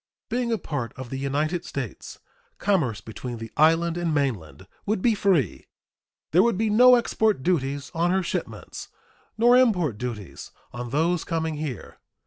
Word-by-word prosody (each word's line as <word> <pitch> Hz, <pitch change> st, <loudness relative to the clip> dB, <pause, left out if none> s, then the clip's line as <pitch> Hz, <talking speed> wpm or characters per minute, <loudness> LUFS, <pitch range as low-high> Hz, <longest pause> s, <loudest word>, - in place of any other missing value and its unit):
Being 240 Hz, 0 st, -1 dB
a 225 Hz, -, +1 dB
part 135 Hz, -, -4 dB
of 130 Hz, -2 st, -8 dB
the 135 Hz, -, -3 dB
United 150 Hz, +5 st, -1 dB
States, -, -, -6 dB, 0.4 s
commerce 140 Hz, -, 0 dB
between 120 Hz, +3 st, -7 dB
the 115 Hz, 0 st, -8 dB
island 165 Hz, +2 st, +3 dB
and 175 Hz, -2 st, -1 dB
mainland 115 Hz, -, -2 dB, 0.2 s
would 215 Hz, 0 st, +1 dB
be 230 Hz, +4 st, +3 dB
free. 185 Hz, -, 0 dB, 0.6 s
There 175 Hz, -, +5 dB
would 235 Hz, -2 st, +2 dB
be 220 Hz, 0 st, +1 dB
no 250 Hz, +4 st, +7 dB
export 220 Hz, -, +1 dB
duties 140 Hz, -4 st, -1 dB
on 170 Hz, +1 st, +1 dB
her 190 Hz, +1 st, +1 dB
shipments -, -, -5 dB, 0.5 s
nor 240 Hz, +2 st, +5 dB
import 180 Hz, -, +3 dB
duties 115 Hz, -6 st, -6 dB, 0.2 s
on 120 Hz, 0 st, -5 dB
those 165 Hz, +5 st, +1 dB
coming 160 Hz, -2 st, -2 dB
here. 145 Hz, -7 st, -6 dB
160 Hz, 155 wpm, -25 LUFS, 130-195 Hz, 0.6 s, no